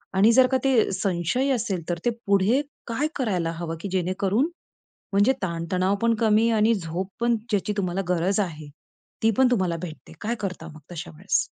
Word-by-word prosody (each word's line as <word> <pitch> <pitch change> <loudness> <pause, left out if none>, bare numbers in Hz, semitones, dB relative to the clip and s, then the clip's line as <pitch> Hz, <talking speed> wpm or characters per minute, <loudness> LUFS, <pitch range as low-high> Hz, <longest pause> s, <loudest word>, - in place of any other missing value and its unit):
आणि 205 +4 +6
जर 255 +2 +6
का 260 - +2
ते 260 -7 +3
संशय 190 +7 0
असेल 205 -7 -2
तर 175 - 0
ते 240 - +4 0.2
पुढे 200 +7 +3 0.3
काय 250 +6 0
करायला 185 - 0
हवं? 165 0 -4
की 200 - -4
जेणेकरून 190 - +1 0.6
म्हणजे 205 +7 +4
ताणतणावपण 185 +5 0
कमी 225 +1 +4
आणि 220 +1 +4
झोपपण 190 +6 -2 0.2
ज्याची 210 0 0
तुम्हाला 185 -1 -1
गरज 180 +3 +1
आहे, 155 -6 -3 0.5
ती 225 - +5
पण 260 -1 +5
तुम्हाला 185 -7 +1
भेटते. 165 -3 -9
काय 230 +3 -1
करता 185 -5 -4
मग 155 -1 -12
तशा 155 - -6
वेळेस? - - +1
195 Hz, 165 wpm, -25 LUFS, 175-230 Hz, 0.6 s, आणि